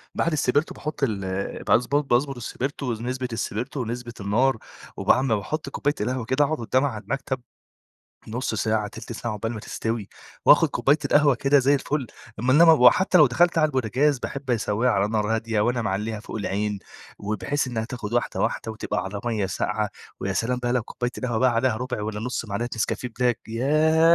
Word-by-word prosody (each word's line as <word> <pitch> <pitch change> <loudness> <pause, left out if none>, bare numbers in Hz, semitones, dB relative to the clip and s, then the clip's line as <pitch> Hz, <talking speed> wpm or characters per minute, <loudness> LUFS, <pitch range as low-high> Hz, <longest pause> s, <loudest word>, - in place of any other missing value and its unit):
بعد 170 - +1
السبرتو 145 0 +1
باحط 150 -2 -5
ال 100 -5 -2
باضبط 140 +4 +2
باضبط 135 +3 +2
السبرتو 130 +1 -3
نسبة 125 +3 -3
السبرتو 120 +4 -3
ونسبة 120 0 -5
النار 115 +6 +2 0.4
وبعمِ 130 -4 +3
باحط 140 +9 -4
كوباية 145 +1 -1
القهوة 125 +1 -1
كده 130 +5 +2
أقعُد 155 +1 -1
قُدّامها 130 +4 +1
على 110 -3 -7
المكتب 130 -2 -3 0.9
نُص 115 0 -2
ساعة، 110 -1 0
تلت 115 - -9
ساعة 115 0 -4
عقبال 115 +2 -3
ما 110 - -6
تستوي، 110 -2 -3 0.4
وآخُد - - +7
كوباية 145 +3 +2
القهوة 145 -2 +4
كده 140 +4 +3
زي 140 +2 +4
الفل 140 -1 -1 0.3
أمّا 130 +2 +2
إنما 165 +3 +8
وحتى 160 +7 +5
لو 150 - +8
دخلت 170 +8 +3
على 155 - +5
البوتجاز 135 +1 +1
باحب 140 0 -5
أسوّيها 115 +1 +1
على 100 -1 +2
نار 110 0 0
هادية 110 -1 -1
وأنا 120 +2 +1
معلّيها 105 +1 -2
فوق 110 - -7
العين، 105 0 -2 0.4
وبحيث 110 +8 -2
إنها 115 -3 -2
تاخد 120 -3 -6
واحدة 120 - 0
واحدة 110 - -1
وتبقى 95 -3 -3
على 100 +1 -5
مَيّة 110 -5 0
ساقعة، 95 - -1 0.3
ويا 95 - -1
سلام 125 +5 0
بقى 120 - 0
لو 125 -2 +1
كوباية 120 +2 -4
القهوة 120 -4 -1
بقى 130 0 +4
عليها 115 -1 +2
ربع 125 -3 -3
والّا 105 0 -4
نُص 125 0 -3
معلقة 115 +3 -3
نسكافيه 125 +3 -1
بلاك 125 -2 +1
ياه! 155 +7 +4
120 Hz, 180 wpm, -24 LUFS, 110-135 Hz, 0.9 s, إنما